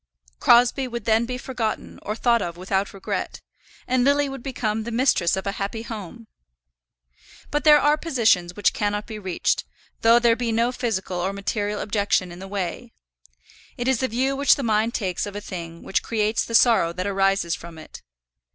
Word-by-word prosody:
Crosbie 245 +2 +4
would 235 -3 -6
then 225 +1 +2
be 250 0 -3
forgotten 245 -4 -4
or 210 - -4
thought 235 -1 +2
of 170 -2 -4
without 190 +2 -1
regret, 195 - -4 0.5
and 255 0 +1
Lily 285 +2 +3
would 270 -2 -7
become 225 -4 -2
the 225 - -5
mistress 235 -8 +2
of 190 - -4
a 200 - 0
happy 220 +3 -3
home. 225 0 -8 1.3
But 295 +1 -1
there 300 -1 +8
are 295 +1 +3
positions 220 - +1
which 205 - +2
cannot 205 0 -1
be 215 -2 -7
reached, 190 -4 -1 0.4
though 230 +1 +6
there 235 -1 +4
be 240 -1 -2
no 230 +2 +1
physical 195 -7 -3
or 185 +3 -1
material 205 +1 -2
objection 200 -3 0
in 175 - -10
the 190 - -8
way. 200 +4 -4 0.8
It 245 0 -3
is 265 -2 +2
the 260 - 0
view 260 +4 0
which 280 0 +4
the 280 - -4
mind 220 +1 +1
takes 190 -2 -2
of 205 - -8
a - - -3
thing 170 -4 -8
which - - 0
creates 215 -1 0
the 230 - -3
sorrow 225 -8 +4
that 185 +1 -4
arises 195 -3 +1
from 170 -1 -8
it. 155 - -11
220 Hz, 190 wpm, -23 LUFS, 195-245 Hz, 1.3 s, there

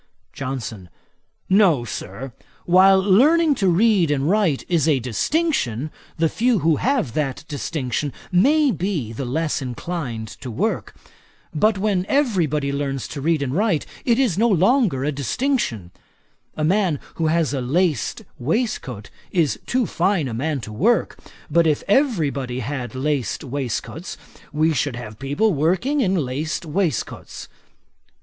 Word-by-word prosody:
JOHNSON. 120 -8 -5 0.6
'No, 185 - +4
Sir. 120 +4 -6 0.3
While 190 +2 +6
learning 290 - +4
to 205 -8 0
read 185 -1 +3
and 145 -1 0
write 185 -7 +2
is 165 -4 +2
a 150 -4 +4
distinction, 135 - -1 0.3
the 165 0 +3
few 235 +7 +1
who 160 -3 +4
have 245 - 0
that 145 0 -2
distinction 145 -1 -3 0.2
may 280 - +4
be 170 - -2
the 130 +4 -4
less 150 +5 -1
inclined 125 -3 -4
to 130 - -9
work; 110 - -2 0.6
but 210 +7 +2
when 195 -2 0
every 235 - +2
body 140 -1 -1
learns 140 -2 -2
to 140 - -6
read 160 0 +1
and 130 -1 -3
write, 190 -3 +1 0.2
it 235 -2 +2
is 235 -9 +1
no 235 +1 +4
longer 195 - +3
a 150 - 0
distinction. 140 - -1 0.7
A 155 - -1
man 180 -3 +2 0.2
who 165 - +1
has 160 -2 +1
a 135 - -1
laced 150 +1 0 0.2
waistcoat 130 - -2 0.2
is 165 -6 +1
too 250 -1 +1
fine 185 -5 0
a 120 - -4
man 140 +4 -2
to 110 - -8
work; 220 - +1 0.3
but 165 +2 +3
if 150 -2 +1
every 205 - +2
body 130 -2 -4
had 125 -2 -4
laced 140 0 -1
waistcoats, 135 -4 -4 0.3
we 155 +2 +2
should 145 -2 -1
have 110 -3 -8
people 165 +11 +1
working 185 - +1
in 195 -5 +2
laced 150 +1 -2
waistcoats. 160 - -3
155 Hz, 145 wpm, -22 LUFS, 135-200 Hz, 0.7 s, While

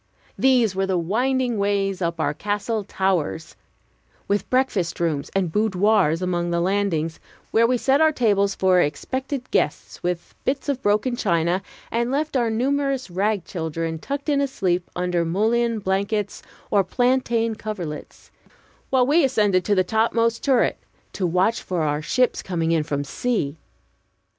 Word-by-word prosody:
These 245 -7 +3
were 195 0 0
the 190 -1 +1
winding 240 +6 0
ways 200 -1 0
up 170 -1 -1
our 145 -2 +1
castle 205 +4 -2
towers, 185 -5 -1 0.7
with 200 -1 -1
breakfast 215 -11 0
rooms 155 -5 -1
and 185 -4 +1
boudoirs 200 -4 +2
along 175 -1 -1
the 170 0 0
landings, 175 -4 0 0.3
where 230 +1 +4
we 250 +1 +2
set 270 +4 +2
our 315 0 +5
tables 200 -7 +2
for 185 -1 +4
expected 260 - -3
guests - - -1
with 175 -1 -3
bits 275 +2 -1
of 275 -2 -1
broken 215 +4 +1
china, 175 -4 +1 0.3
and 235 +1 0
left 295 +3 -1
our 240 -3 +2
numerous 270 0 0
rag 200 +1 0
children 160 -1 -3
tucked 280 - -5
in 285 -2 +2
asleep 185 -10 -1
under 180 -1 0
mullein 225 +7 +1
blankets 200 +1 -1 0.3
or 200 -1 +4
plantain 235 +1 +1
coverlets, 185 -9 -7 0.6
while 260 -2 +3
we 300 +5 +4
ascended 210 -8 +2
to 205 - +2
the 185 - +3
topmost 230 +3 +1
turret 265 -3 +2 0.3
to 185 - -1
watch 185 +7 +1
for 175 -3 -2
our 150 0 0
ships 250 +10 +1
coming 165 -3 -1
in 165 -1 +3
from 145 -1 -2
sea. 145 - -2
200 Hz, 150 wpm, -23 LUFS, 175-240 Hz, 0.7 s, our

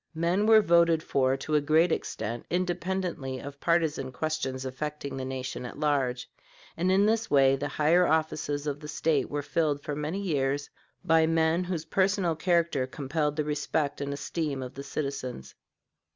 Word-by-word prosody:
Men 175 +6 +1
were 220 -1 +7
voted 170 -2 +4
for 135 -1 +1
to 155 +3 -5
a 150 - +4
great 160 +4 +3
extent 115 -5 -3
independently 180 -6 -2
of 140 +2 -9
partisan 160 -6 +1
questions 135 -2 -3
affecting 140 +1 -5
the 130 -1 -4
nation 130 -1 -4
at 125 - -7
large, 135 -5 0 0.5
and 180 +3 +1
in 195 +2 +4
this 225 +1 +1
way 135 -1 +5
the 140 +2 -3
higher 160 +5 +3
offices 155 -2 0
of 145 -1 -2
the 150 - -9
State 150 -2 0
were 145 0 -3
filled 145 -2 0
for 145 - -3
many 150 +6 -3
years 145 -6 -1 0.3
by 160 -1 +4
men 165 +2 +2
whose 175 -3 -3
personal 190 0 +1
character 170 -5 +1
compelled 150 +3 -2
the 155 - 0
respect 150 0 -1
and 140 0 -2
esteem 145 -1 -3
of 125 - -8
the 140 - -7
citizens. 135 - -5
150 Hz, 165 wpm, -28 LUFS, 140-170 Hz, 0.5 s, were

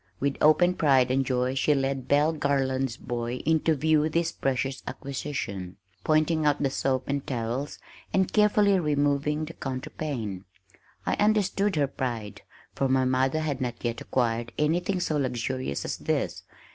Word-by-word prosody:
With 140 0 0
open 175 +4 +5
pride 135 -7 +3
and 135 +1 +2
joy 125 0 0
she 145 +2 +2
led 135 -1 -1
Belle 150 +3 +3
Garland's 135 -4 0
boy 120 0 -4
in 160 +1 +3
to 160 +1 +2
view 155 +1 +2
this 165 +1 0
precious 135 0 -2
acquisition, 125 -10 -5 0.3
pointing 155 +1 +2
out 150 -1 +2
the 135 - +1
soap 130 -1 -1
and 140 0 -1
towels, 125 +3 -3 0.3
and 190 -1 +1
carefully 210 -2 +4
removing 150 0 +1
the 165 - -9
counterpane! 130 - -5 0.6
I - - +1
understood 205 -2 +2
her 145 -2 +3
pride, 120 -6 -4 0.3
for 135 - 0
my 130 0 +3
mother 130 +4 +1
had 150 -4 -2
not 120 -2 -2
yet 115 -1 -2
acquired 120 -2 -1
anything 175 +5 +1
so 155 -3 0
luxurious 130 - -2
as - - -3
this. - - -2
140 Hz, 155 wpm, -27 LUFS, 130-155 Hz, 0.6 s, open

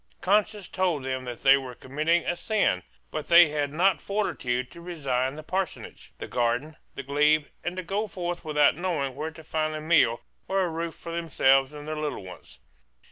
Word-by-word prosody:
Conscience 205 +1 +1
told 180 -7 0
them 130 -1 -3
that 120 -2 -7
they 135 0 +8
were 130 -2 -7
committing 155 +7 0
a 175 - 0
sin. 185 - +1 0.3
But 155 - -4
they 170 -2 +8
had 145 -1 -1
not 175 +1 +2
fortitude 130 -12 -2
to 170 - -12
resign 135 -6 -2
the 155 - -8
parsonage, 185 +3 -4
the - - -6
garden, 125 +6 -1 0.2
the 140 - -5
glebe, 150 +2 +3 0.2
and 175 +1 -3
to 185 - -3
go 200 +5 -2
forth 175 -3 -4
without 150 -3 +3
knowing 160 -6 -2
where 150 +4 -4
to 160 0 -13
find 155 0 -1
a - - -3
meal 155 -7 +3 0.3
or 195 0 +1
a 180 - 0
roof 165 0 -4
for 170 - -8
themselves 135 -5 +3
and 150 0 -9
their 155 0 -3
little 150 -9 -3
ones. 90 -8 -12
155 Hz, 190 wpm, -27 LUFS, 135-175 Hz, 0.3 s, they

